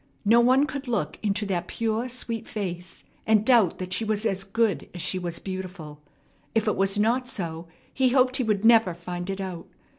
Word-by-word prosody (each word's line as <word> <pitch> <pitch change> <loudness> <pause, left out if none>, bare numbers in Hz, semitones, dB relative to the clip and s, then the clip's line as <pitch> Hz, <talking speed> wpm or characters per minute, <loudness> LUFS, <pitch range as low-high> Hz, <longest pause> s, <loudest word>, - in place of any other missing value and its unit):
No 230 +3 +6
one 255 +4 +4
could 280 -2 -6
look 155 -11 -2
into 210 0 0
that 175 -3 -2
pure, 230 +2 -2
sweet 235 -2 -4
face, 180 -4 -5 0.2
and 215 -1 +4
doubt 230 -8 +4
that 185 0 -5
she 205 - -1
was 215 0 -1
as 195 -3 0
good 195 -5 0
as 175 - -5
she 185 - -1
was 175 -2 -4
beautiful. 185 -6 -7 0.5
If 225 -1 +2
it 210 - +2
was 195 +1 +1
not 240 +4 +1
so, 165 -6 -5 0.3
he 260 -1 +3
hoped 255 0 +3
he 255 - 0
would 215 -2 0
never 225 -6 +5
find 175 +1 -6
it 195 0 -3
out. 185 -3 -6
205 Hz, 200 wpm, -26 LUFS, 180-230 Hz, 0.5 s, No